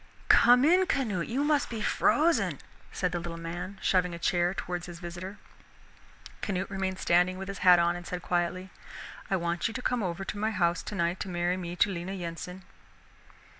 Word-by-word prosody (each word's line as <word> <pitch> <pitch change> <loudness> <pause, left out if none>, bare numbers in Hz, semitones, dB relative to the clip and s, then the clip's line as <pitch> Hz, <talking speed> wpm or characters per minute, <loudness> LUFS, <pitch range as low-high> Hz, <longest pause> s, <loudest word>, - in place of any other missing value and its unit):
"Come 245 +3 +7
in, 365 +4 +4
Canute, 225 - -1
you 265 +5 -1
must 295 -1 +2
be 230 - -4
frozen," 315 +9 +2 0.3
said 180 -1 -1
the 175 - -2
little 170 0 -6
man, 175 +4 -6
shoving 180 -2 +2
a - - -6
chair 175 +1 +1
towards 180 -2 -4
his 175 -1 -8
visitor. 175 +4 -7 1.0
Canute 195 -1 -2
remained 190 -1 -2
standing 180 +1 +2
with 195 0 -6
his 195 - -6
hat 180 -2 +7
on 170 0 +2
and 175 0 -8
said 180 -1 -5
quietly, 180 +1 -1 0.6
"I 195 - +2
want 170 +1 -1
you 225 - -7
to 255 - -3
come 245 -2 0
over 185 0 -3
to 205 - -5
my 215 +1 +1
house 175 -5 +1
tonight 175 -3 -2
to 195 - -4
marry 175 0 0
me 175 -1 -5
to 200 +3 +3
Lena 180 +1 -4
Yensen." 180 +1 -6
180 Hz, 190 wpm, -29 LUFS, 175-200 Hz, 1.0 s, Come